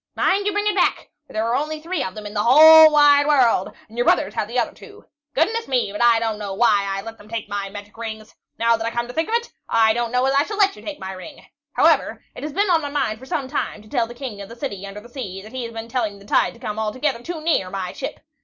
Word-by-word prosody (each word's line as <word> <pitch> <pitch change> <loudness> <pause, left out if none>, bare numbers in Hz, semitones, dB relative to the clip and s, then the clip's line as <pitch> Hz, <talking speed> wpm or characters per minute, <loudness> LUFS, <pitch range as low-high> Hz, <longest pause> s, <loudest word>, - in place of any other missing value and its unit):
Mind 400 +1 +1
you - - +2
bring 415 +1 -1
it 420 - +2
back, - - 0 0.2
for - - -15
there 220 +1 -1
are 230 +1 0
only 305 +2 -2
three 335 0 -3
of 185 -6 -4
them 215 -1 -8
in 205 - -7
the 205 - 0
whole 315 +6 +9
wide 290 -1 +5
world, 250 -10 +3 0.2
and 220 - -16
your - - +3
brothers - - +2
have - - -2
the - - -4
other - - 0
two. - - -15 0.3
Goodness 445 +10 +1
me, 250 -6 0
but 210 - -5
I 240 -1 +5
don't 225 -2 -2
know 200 -2 -5
why 210 -2 +3
I 195 0 -3
let 225 +1 -9
them 205 - -16
take 230 -2 -4
my 200 -1 -4
magic 205 +1 -10
rings. 220 -1 -7 0.2
Now 230 0 +3
that 225 0 -4
I - - +1
come 235 0 -2
to - - -7
think 320 +8 -1
of 455 - +1
it, 475 0 -2 0.2
I 220 -1 +4
don't 240 0 -2
know 250 +1 +1
as 270 - +2
I 280 - +4
shall 410 +7 -4
let 400 -1 +3
you - - -13
take 300 -2 -7
my 190 0 -6
ring. 190 +11 -11 0.3
However, - - +2
it - - -10
has 300 - -4
been 395 +4 +1
on 330 -2 +3
my 290 - -4
mind 270 -7 -1
for 260 - -13
some 270 0 -2
time 210 -4 -4
to - - -17
tell 235 0 0
the 240 - -11
King 240 -6 -7
of 200 - -9
the 230 - -10
City 200 -7 -5
under 200 +1 -9
the 235 - -14
Sea 205 -7 -7
that 215 - -12
he's 245 -3 -5
been 225 0 -7
telling 225 -4 -2
the 200 - -16
tide - - +1
to - - -17
come 220 -3 -5
altogether 235 +4 -2
too 335 +5 -6
near 310 - 0
my 185 -1 -4
ship. - - -6
235 Hz, 295 wpm, -21 LUFS, 210-295 Hz, 0.3 s, whole